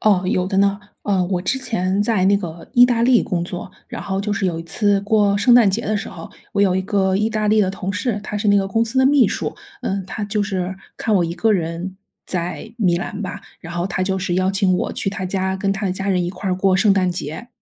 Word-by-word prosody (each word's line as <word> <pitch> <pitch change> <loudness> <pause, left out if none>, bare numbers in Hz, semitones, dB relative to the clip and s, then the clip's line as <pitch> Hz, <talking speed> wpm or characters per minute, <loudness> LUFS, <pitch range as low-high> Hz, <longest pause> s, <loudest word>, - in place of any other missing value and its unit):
哦， 200 -4 +3
有 185 0 +1
的 195 0 0
呢， 200 0 +3 0.2
呃， 195 -3 +1
我 180 0 -1
之 265 - 0
前 195 -6 0
在 210 -4 +1
那 200 +1 +5
个 170 -4 -7
意 245 - +8
大 240 -2 +2
利 245 0 +5
工 175 -4 -2
作， 185 +3 -6 0.2
然 - - -6
后 195 0 -2
就 210 +1 -2
是 200 -1 -1
有 170 -3 -1
一 - - -6
次 200 +3 +1
过 205 -1 +2
圣 240 +4 +5
诞 235 -5 +6
节 205 +4 -1
的 215 0 +1
时 220 - -4
候， 165 - -9 0.2
我 200 - 0
有 190 -2 +3
一 190 - 0
个 190 -1 +1
意 215 +3 +1
大 215 -1 0
利 215 0 +4
的 190 - +2
同 195 0 -4
事， 210 0 -2
她 210 - -4
是 205 +1 0
那 205 - +5
个 195 -1 +1
公 225 +3 +1
司 230 +3 -2
的 260 - +5
秘 280 -2 +5
书， - - -3 0.3
嗯， 195 0 -2
她 210 - -5
就 210 0 -1
是 190 -2 -2 0.2
看 220 - 0
我 180 -3 +3
一 165 - -3
个 200 +6 +2
人 175 +1 -2 0.3
在 180 +5 -4
米 185 -7 +2
兰 200 +3 -5
吧， 190 - -5 0.2
然 170 - -8
后 175 +1 -1
她 185 -1 -2
就 190 0 0
是 180 -1 -2
邀 185 +1 +2
请 195 -2 +2
我 - - -2
去 - - -2
她 195 -1 -4
家 190 0 -1
跟 195 +1 0
她 195 +1 -2
的 185 - 0
家 195 +1 -4
人 185 -2 +2
一 175 - -2
块 185 +1 -4
儿 - - +2
过 190 0 +2
圣 200 +2 +4
诞 185 -2 +2
节。 175 +6 -6
195 Hz, 290 characters per minute, -20 LUFS, 185-210 Hz, 0.3 s, 意